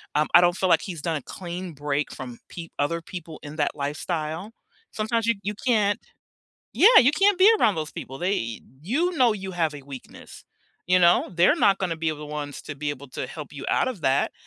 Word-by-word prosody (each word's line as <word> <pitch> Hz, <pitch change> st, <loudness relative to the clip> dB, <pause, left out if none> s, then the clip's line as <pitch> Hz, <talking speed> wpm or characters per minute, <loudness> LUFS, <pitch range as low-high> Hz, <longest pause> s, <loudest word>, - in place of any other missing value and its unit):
Um, 150 Hz, +1 st, +2 dB
I 175 Hz, -, +9 dB
don't 175 Hz, +1 st, +3 dB
feel 185 Hz, -, +1 dB
like -, -, +5 dB
he's 170 Hz, -6 st, -6 dB
done 165 Hz, -2 st, -1 dB
a -, -, -7 dB
clean 175 Hz, +3 st, -7 dB
break 145 Hz, 0 st, -2 dB
from 125 Hz, -2 st, -8 dB
peo 165 Hz, -2 st, -8 dB
other 165 Hz, +4 st, 0 dB
people 165 Hz, -2 st, -9 dB
in 150 Hz, +2 st, -9 dB
that 145 Hz, -, 0 dB
lifestyle. 155 Hz, +6 st, -4 dB, 0.4 s
Sometimes 225 Hz, +1 st, -1 dB
you 230 Hz, -, +3 dB
you 210 Hz, +2 st, -2 dB
can't 210 Hz, -4 st, +2 dB, 0.8 s
yeah, 450 Hz, +4 st, +7 dB
you 265 Hz, +4 st, +4 dB
can't 395 Hz, +1 st, +3 dB
be 385 Hz, +3 st, +7 dB
around 210 Hz, -6 st, +3 dB
those 155 Hz, -1 st, -4 dB
people. 135 Hz, +1 st, -8 dB
They 115 Hz, -, -2 dB, 0.2 s
you 320 Hz, -, 0 dB
know 245 Hz, -4 st, +4 dB
you 190 Hz, -2 st, -6 dB
have 165 Hz, -4 st, 0 dB
a 140 Hz, -, -9 dB
weakness, 135 Hz, -2 st, -12 dB, 0.4 s
you 185 Hz, 0 st, +4 dB
know? 175 Hz, +1 st, +4 dB
They're 175 Hz, +2 st, +4 dB
not 195 Hz, -1 st, +3 dB
gonna 175 Hz, -4 st, -2 dB
be 160 Hz, 0 st, -1 dB
the 150 Hz, -1 st, -7 dB
ones 145 Hz, -1 st, -6 dB
to 145 Hz, -, -7 dB
be 145 Hz, +1 st, -3 dB
able 140 Hz, -1 st, -8 dB
to -, -, -4 dB
help 150 Hz, -3 st, -9 dB
you 140 Hz, -, -8 dB
out -, -, +2 dB
of 225 Hz, -9 st, -6 dB
that. 135 Hz, +1 st, +2 dB
170 Hz, 215 wpm, -25 LUFS, 150-200 Hz, 0.8 s, I